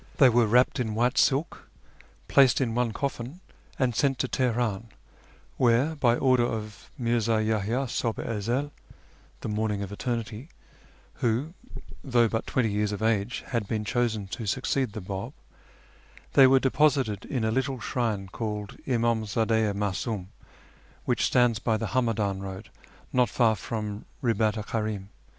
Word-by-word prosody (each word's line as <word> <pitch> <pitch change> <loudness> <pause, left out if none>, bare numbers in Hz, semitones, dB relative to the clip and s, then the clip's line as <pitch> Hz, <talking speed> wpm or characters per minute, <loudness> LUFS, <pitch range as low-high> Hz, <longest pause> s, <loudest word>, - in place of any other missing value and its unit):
They 130 - +7
were 120 -1 +3
wrapped 125 +5 +3
in 110 -3 -1
white 120 +3 +2
silk, 140 +5 +1 0.7
})laced 135 -3 +6
in 120 -4 0
one 120 -1 +1
coIlin, 135 +5 -4 0.4
and 125 -4 +1
sent 135 -2 +2
to 130 - -1
Tolionin, 120 -5 0 0.7
where, 125 +6 +3
by 120 -5 +3
order 130 -1 +3
of 110 -3 -5
Mi'rzii 115 -2 +1
Yahyt'i 110 +5 0
Huhk 115 -1 -2
i - - -4
Ezcl 120 +6 -1 0.3
(" - - -30
the - - -4
^lorniug 105 -1 -1
of 100 - -7
Eternity," 115 +4 -4 0.7
who, 125 +8 0 0.5
thougli 120 -4 +3
but 115 - -2
twenty 115 -5 +1
years 105 0 0
of 105 +1 -4
age, 110 +1 0
had 115 -5 -1
been 105 0 -2
chosen 110 -2 0
to 115 +1 -5
succeed 130 +1 0
the 110 - -5
Bab), 95 +1 -5 1.0
they 135 -1 +8
were 135 0 +5
deposited 135 -6 +2
in 125 -5 -2
a 110 - +1
little 130 +2 -1
shrine 110 -5 -2
called 105 0 -5
Imdm 115 -3 +1
zdd4 110 0 +1
i - - -2
Ma 100 0 -1
sibn, 95 -1 -4 0.8
which - - +1
stands 120 -3 +3
by 110 0 +1
the 110 -2 -3
Hamadiin 110 -6 0
road 95 -1 -8 0.4
not 125 -1 +3
far 115 -3 +3
from 105 0 -5 0.2
liibat 110 -2 +1
Kari'm. 105 -4 -3
115 Hz, 155 wpm, -27 LUFS, 105-125 Hz, 1.0 s, they